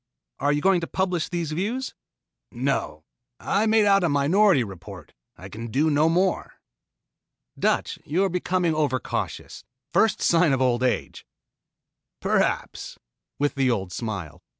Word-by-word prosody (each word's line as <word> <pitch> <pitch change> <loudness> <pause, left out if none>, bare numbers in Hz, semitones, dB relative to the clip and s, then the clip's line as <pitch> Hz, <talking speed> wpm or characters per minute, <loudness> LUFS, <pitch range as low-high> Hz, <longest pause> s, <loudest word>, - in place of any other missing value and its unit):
"Are 145 +1 +1
you 145 0 0
going 190 0 +3
to 165 - -4
publish 180 -3 -1
these 170 -3 -3
views?" 220 +11 -3 0.6
"No. 120 - -2 0.4
I 210 +3 0
made 220 -1 +4
out 195 -2 +4
a 175 - +2
minority 150 - +3
report. 95 -4 -10 0.2
I 95 - -10
can 115 +4 -7
do 145 +7 +1
no 150 +2 +3
more." 180 +2 0 1.1
"Dutch, - - 0
you 170 +7 0
are 195 - +1
becoming 180 -1 0
over 145 -4 0
cautious. - - -5 0.3
First 220 -1 +3
sign 165 -3 +3
of 135 - +1
old 125 -2 +1
age." 130 -1 -2 0.9
"Perhaps," - - -1 0.4
with 145 0 0
the 135 -2 +1
old 95 -6 -1
smile. 95 -10 -5
150 Hz, 145 wpm, -24 LUFS, 125-185 Hz, 1.1 s, made